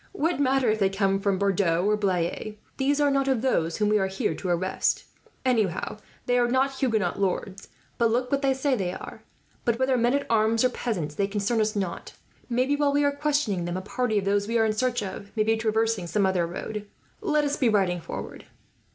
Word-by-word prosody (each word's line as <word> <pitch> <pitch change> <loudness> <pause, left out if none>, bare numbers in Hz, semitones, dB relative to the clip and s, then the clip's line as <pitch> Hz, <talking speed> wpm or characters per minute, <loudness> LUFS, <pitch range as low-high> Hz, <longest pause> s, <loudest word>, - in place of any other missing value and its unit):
"What 335 -4 0
matter 270 -2 +2
if 215 - -1
they 195 -2 +3
came 195 0 +1
from 195 -1 +1
Bordeaux 185 -3 +1
or 210 +1 +3
Blaye, 200 +1 -1 0.2
these 280 +2 +1
are 290 -1 +3
not 275 0 +1
of 260 -3 +1
those 165 -11 +1
whom 210 -1 +1
we 210 0 +3
are 190 - +1
here 190 -3 -1
to 180 +4 -5
arrest. 180 +2 0 0.4
Anyhow 215 -6 0 0.3
they 245 0 +2
are 240 - +3
not 260 +3 +2
Huguenot 225 -7 0
lords, 195 0 -2 0.3
but 230 -1 +4
look 250 +2 0
what 280 0 +1
they 270 -1 +2
say 270 +1 0
they 185 -5 -2
are; - - -9 0.4
but 235 -1 +1
whether 260 0 +2
men 240 +3 +2
at 280 - -1
arms, 225 +1 +2
or 255 - +4
peasants, 185 -12 -3
they 195 +4 0
concern 210 +3 0
us 215 0 0
not. 190 -4 -4 0.4
Maybe, 255 +4 +1
while 290 -1 +1
we 290 0 +3
are 285 - +3
questioning 285 - 0
them, 175 +1 -3
a - - -3
party 220 +2 -1
of 195 - 0
those 200 +1 +1
we 230 +1 +1
are 225 - +3
in 215 - +1
search 245 0 0
of 200 +1 -7
may 215 - +4
be 225 +1 +2
traversing 220 -3 0
some 200 +3 +1
other 185 -3 +1
road. 210 +4 -6 0.3
Let 300 -7 +1
us 290 0 0
be 255 -5 +2
riding 190 -5 +1
forward." - - -7
220 Hz, 220 wpm, -26 LUFS, 195-260 Hz, 0.4 s, but